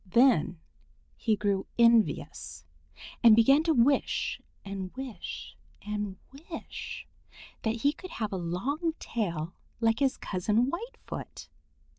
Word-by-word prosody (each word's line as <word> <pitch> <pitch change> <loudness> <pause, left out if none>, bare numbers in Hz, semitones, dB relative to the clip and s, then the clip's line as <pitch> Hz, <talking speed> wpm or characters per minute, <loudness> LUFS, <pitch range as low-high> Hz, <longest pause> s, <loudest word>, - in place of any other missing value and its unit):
Then 225 - +4 0.6
he 220 -2 +1
grew 200 -2 0
envious 155 - +2 0.6
and 230 -2 +9
began 270 +6 +6
to 325 - +4
wish 265 +4 +2 0.2
and 195 -2 -5
wish 260 -4 -6 0.3
and 210 -2 -3 0.3
wish 325 - -6 0.6
that 225 0 -1
he 285 +1 +4
could 370 - -10
have 215 -2 -2
a - - -1
long 270 - -1
tail 170 -7 -3 0.3
like 225 -1 +2
his 270 -1 +2
cousin 210 +7 +1
Whitefoot. 470 +7 -7
225 Hz, 115 wpm, -29 LUFS, 190-270 Hz, 0.6 s, and